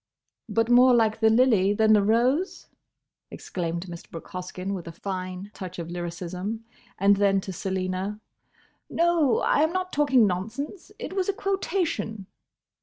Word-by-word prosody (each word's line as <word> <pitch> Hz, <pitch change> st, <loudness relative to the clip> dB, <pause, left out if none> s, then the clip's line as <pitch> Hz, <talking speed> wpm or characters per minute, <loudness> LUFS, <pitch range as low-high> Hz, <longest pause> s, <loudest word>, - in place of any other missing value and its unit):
"But 225 Hz, 0 st, +1 dB
more 250 Hz, +1 st, +7 dB
like 220 Hz, -1 st, +2 dB
the 220 Hz, -1 st, +5 dB
lily 220 Hz, -4 st, +4 dB
than 220 Hz, +1 st, +4 dB
the 210 Hz, -, +5 dB
rose?" 245 Hz, -, +1 dB, 0.6 s
exclaimed 170 Hz, -1 st, -4 dB
Mr. 170 Hz, -2 st, -10 dB
Brooke 165 Hz, -, -9 dB
Hoskyn 185 Hz, +1 st, -5 dB
with 180 Hz, -3 st, -6 dB
a -, -, -5 dB
fine 185 Hz, +2 st, -6 dB
touch 185 Hz, -2 st, -8 dB
of 170 Hz, -1 st, -6 dB
lyricism; 180 Hz, +5 st, -5 dB, 0.3 s
and 200 Hz, +1 st, +4 dB
then 195 Hz, -1 st, +3 dB
to 190 Hz, -, -6 dB
Selina, 190 Hz, +2 st, -3 dB, 0.7 s
"No; 335 Hz, -6 st, +2 dB
I -, -, +3 dB
am 315 Hz, +1 st, +3 dB
not 370 Hz, 0 st, -3 dB
talking 275 Hz, -5 st, +4 dB
nonsense! 225 Hz, -, -4 dB
It -, -, -6 dB
was 380 Hz, 0 st, -1 dB
a -, -, +2 dB
quotation." 355 Hz, -, -2 dB
210 Hz, 150 wpm, -26 LUFS, 185-260 Hz, 0.7 s, more